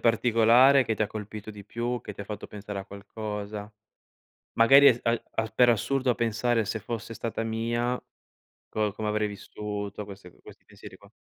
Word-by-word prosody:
particolare, 120 Hz, +4 st, +5 dB
che 115 Hz, -2 st, -1 dB
ti 110 Hz, -, -1 dB
ha -, -, +1 dB
colpito 105 Hz, 0 st, -7 dB
di 105 Hz, -1 st, -11 dB
più, 120 Hz, +2 st, -3 dB
che 105 Hz, -, -8 dB
ti 100 Hz, -, -7 dB
fatto 105 Hz, 0 st, -7 dB
pensare 105 Hz, -1 st, -7 dB
a 95 Hz, -, -7 dB
qualcosa? 105 Hz, +1 st, -6 dB, 0.8 s
Magari, 135 Hz, +5 st, +7 dB
es 120 Hz, -3 st, +5 dB
al 115 Hz, 0 st, +1 dB
a 110 Hz, -, +1 dB
per 125 Hz, +1 st, +5 dB
assurdo 130 Hz, +3 st, +1 dB
a 120 Hz, -, +3 dB
pensare: 115 Hz, -1 st, +1 dB
"Se 110 Hz, +2 st, -3 dB
fosse 115 Hz, +1 st, -6 dB
stata 115 Hz, +1 st, -3 dB
mia? 120 Hz, +2 st, -1 dB, 0.7 s
Co 105 Hz, -2 st, -1 dB
come 105 Hz, +1 st, -4 dB
avrei 105 Hz, 0 st, +1 dB
vissuto?" 105 Hz, 0 st, -6 dB
Queste, 100 Hz, -2 st, -11 dB
uhm, -, -, -21 dB
questi -, -, -15 dB
pensieri -, -, -13 dB
qua. -, -, -19 dB
110 Hz, 180 wpm, -27 LUFS, 105-120 Hz, 0.8 s, Magari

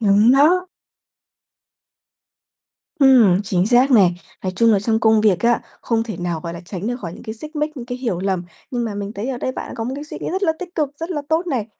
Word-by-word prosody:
Đúng 210 Hz, +3 st, +5 dB
đó. 345 Hz, +7 st, +4 dB, 2.3 s
Ừm, 240 Hz, -9 st, +6 dB
chính 190 Hz, -3 st, 0 dB
xác 250 Hz, +3 st, +4 dB
này. 190 Hz, -7 st, +5 dB, 0.3 s
Nói 185 Hz, -1 st, -2 dB
chung 230 Hz, +1 st, +4 dB
là 200 Hz, -, +4 dB
trong 220 Hz, +1 st, 0 dB
công 220 Hz, -1 st, +4 dB
việc 205 Hz, -5 st, +3 dB
á, 235 Hz, 0 st, +2 dB, 0.2 s
không 225 Hz, -1 st, 0 dB
thể 220 Hz, -6 st, -6 dB
nào, 175 Hz, -2 st, -3 dB
gọi 170 Hz, -1 st, -6 dB
là, 170 Hz, -, -8 dB
tránh 185 Hz, +3 st, -6 dB
được 245 Hz, +1 st, -1 dB
khỏi 170 Hz, -3 st, -6 dB
những -, -, -11 dB
cái 220 Hz, -2 st, -6 dB
xích 305 Hz, +7 st, -10 dB
mích, 300 Hz, 0 st, -2 dB
những 240 Hz, -1 st, -7 dB
cái 245 Hz, 0 st, -5 dB
hiểu 230 Hz, -9 st, -2 dB
lầm. 190 Hz, -2 st, -1 dB, 0.3 s
Nhưng 240 Hz, -2 st, -2 dB
mà 215 Hz, -3 st, -4 dB
mình 205 Hz, +1 st, -5 dB
thấy 220 Hz, +5 st, -5 dB
ở 255 Hz, -2 st, -3 dB
đây 260 Hz, -, -2 dB
bạn -, -, -6 dB
đã -, -, -8 dB
có 225 Hz, -, -3 dB
một 255 Hz, -, -3 dB
cái 290 Hz, +1 st, -6 dB
suy -, -, -8 dB
nghĩ -, -, -3 dB
rất 380 Hz, +2 st, -2 dB
là 320 Hz, -4 st, +3 dB
tích 365 Hz, 0 st, -8 dB
cực, 300 Hz, -4 st, 0 dB
rất 330 Hz, +3 st, -4 dB
là 295 Hz, -4 st, -2 dB
tốt 325 Hz, +3 st, +1 dB
này. 245 Hz, -9 st, -1 dB
230 Hz, 255 wpm, -20 LUFS, 200-275 Hz, 2.3 s, Ừm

